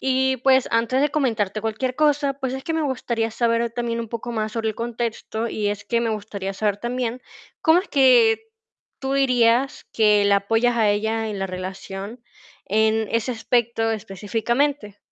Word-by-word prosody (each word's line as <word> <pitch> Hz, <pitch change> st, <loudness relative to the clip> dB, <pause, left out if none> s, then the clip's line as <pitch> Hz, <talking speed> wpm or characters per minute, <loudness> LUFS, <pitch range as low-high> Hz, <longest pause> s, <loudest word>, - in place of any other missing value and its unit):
Y 265 Hz, 0 st, +1 dB
pues, 260 Hz, 0 st, +4 dB
antes 230 Hz, +3 st, +2 dB
de 290 Hz, 0 st, +2 dB
comentarte 220 Hz, -8 st, 0 dB
cualquier 225 Hz, +4 st, -2 dB
cosa, 290 Hz, -1 st, +2 dB
pues, 265 Hz, -2 st, -4 dB
es 265 Hz, +1 st, -6 dB
que 325 Hz, -, -2 dB
me 320 Hz, -, 0 dB
gustaría 235 Hz, -4 st, -1 dB
saber 230 Hz, 0 st, 0 dB
también 235 Hz, 0 st, -2 dB
un 230 Hz, -, -6 dB
poco 235 Hz, +1 st, -5 dB
más 215 Hz, -1 st, -2 dB
sobre 225 Hz, -1 st, -1 dB
el -, -, -8 dB
contexto, 230 Hz, -1 st, -3 dB
y 210 Hz, -2 st, -2 dB
es 205 Hz, 0 st, -4 dB
que 235 Hz, +2 st, 0 dB
me 230 Hz, -1 st, 0 dB
gustaría 200 Hz, -2 st, -4 dB
saber 205 Hz, 0 st, -1 dB
también, 245 Hz, +1 st, -3 dB, 0.4 s
¿cómo 320 Hz, +2 st, +5 dB
es 395 Hz, -, -11 dB
que 250 Hz, -, +5 dB, 0.6 s
tú 270 Hz, 0 st, -2 dB
dirías 255 Hz, -1 st, +2 dB
que 210 Hz, -2 st, +4 dB
la 200 Hz, 0 st, +4 dB
apoyas 225 Hz, +4 st, +1 dB
a 220 Hz, -2 st, +3 dB
ella 220 Hz, +2 st, -1 dB
en 205 Hz, -2 st, -4 dB
la 195 Hz, -, -2 dB
relación, 195 Hz, +4 st, -7 dB, 0.5 s
en 220 Hz, +1 st, +2 dB
ese 230 Hz, +2 st, 0 dB
aspecto 230 Hz, -1 st, 0 dB
específicamente? 220 Hz, +4 st, -2 dB
230 Hz, 175 wpm, -22 LUFS, 215-255 Hz, 0.6 s, cómo